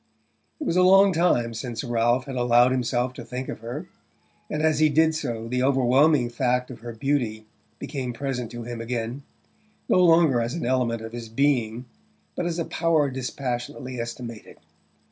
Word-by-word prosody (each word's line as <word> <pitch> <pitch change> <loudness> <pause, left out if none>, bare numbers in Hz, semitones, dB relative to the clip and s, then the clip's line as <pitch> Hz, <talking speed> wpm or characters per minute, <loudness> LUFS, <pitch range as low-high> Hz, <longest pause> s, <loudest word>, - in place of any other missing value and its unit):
It - - -4
was 170 - 0
a - - +5
long 195 +1 +6
time 140 -9 +2
since 115 -1 -5
Ralph 120 +1 +1
had 135 -2 -6
allowed 120 0 +4
himself 125 0 0
to 120 - -8
think 125 +2 -6
of - - -5
her, 120 +9 -6 0.6
and 155 0 -2
as 155 -2 +2
he 155 0 +5
did 160 +2 +3
so 120 -7 -4
the 125 +1 -1
overwhelming 135 +1 +3
fact 125 +1 0
of 120 - -10
her 120 +1 -7
beauty 115 -3 -1 0.3
became 130 -3 -4
present 125 -1 -4
to 120 0 -7
him 120 0 -6
again, 120 +2 -4 0.7
no - - +3
longer 165 -7 +5
as 115 +6 -2
an 170 - -3
element 120 -3 0
of 115 0 -8
his 120 -2 -7
being 120 -2 0 0.5
but 175 - -2
as 170 -1 -2
a 170 - -1
power 160 -4 +1
dispassionately 130 0 -4
estimated. 115 -1 -7
125 Hz, 175 wpm, -25 LUFS, 120-145 Hz, 0.7 s, long